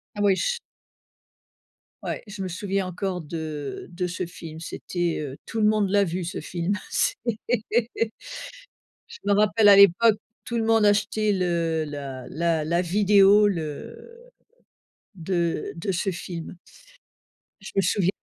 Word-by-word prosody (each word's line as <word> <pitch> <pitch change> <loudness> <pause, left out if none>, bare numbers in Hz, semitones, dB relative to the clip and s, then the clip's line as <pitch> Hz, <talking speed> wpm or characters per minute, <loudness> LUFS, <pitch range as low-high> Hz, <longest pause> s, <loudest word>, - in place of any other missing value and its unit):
Ah - - -7
oui 200 -2 +4
ch 480 - -1 1.4
Ouais, - - -4
je 205 -2 -8
me 190 - -2
souviens 190 +1 -2
encore 185 0 -3
de 155 -2 -5
de 180 +1 -2
ce 180 +1 -3
film 165 -2 -9
c'était, 175 0 -3
heu 140 -2 -6
tout 225 - -4
le 210 - +5
monde 210 -1 +3
l'a 200 0 +4
vu 180 0 -2
ce 170 +3 -4
film 175 +2 -2 0.2
c'est - - +1 1.9
je - - -12
me 200 - +2
rappelle 210 +1 +4
à 200 - +9
l'époque 200 +3 +6 0.3
tout 235 - -2
le 225 - 0
monde 225 -1 +4
achetait 210 +1 +2
le 170 -4 0
la 140 -3 -6
la 165 0 0
la 170 +2 +1
vidéo 200 +2 +5
le 200 - -6 0.9
de 170 -2 -1
de 195 +4 -2
ce 190 +2 -1
film. 170 -1 -7 1.0
Je 195 - -9
me 195 - +4
souviens 185 0 +2
185 Hz, 145 wpm, -25 LUFS, 170-205 Hz, 1.9 s, à